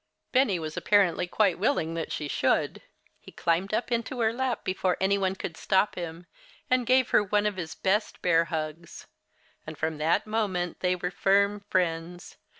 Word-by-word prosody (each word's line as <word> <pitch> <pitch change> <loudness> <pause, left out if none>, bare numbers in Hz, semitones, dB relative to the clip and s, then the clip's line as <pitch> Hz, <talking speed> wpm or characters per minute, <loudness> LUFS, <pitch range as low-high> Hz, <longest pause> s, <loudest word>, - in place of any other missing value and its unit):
Benny 255 -8 +3
was 155 -2 -5
apparently 185 -4 +2
quite 190 -2 +1
willing 185 - 0
that 165 -1 -4
she 150 - -3
should. - - 0 0.4
He - - -14
climbed 170 +4 0
into 235 +2 -2
her 220 0 +2
lap 260 0 -2
before 185 -1 0
any 190 +1 +2
one 190 -1 0
could 170 -3 -6
stop 190 +4 +1
him, 170 -1 -7 0.5
and 250 -2 +2
gave 255 0 +4
her - - +5
one 205 +1 +1
of 210 -1 0
his 160 -3 -5
best 205 +3 0
bear 165 -1 +4
hugs. 160 +1 -5 0.6
And 155 -1 -7
from 160 0 -2
that 160 +2 +1
moment 200 -6 -2
they 180 0 +1
were 180 0 -4
firm 200 +2 +2
friends. 175 -1 -2
185 Hz, 170 wpm, -27 LUFS, 165-210 Hz, 0.6 s, her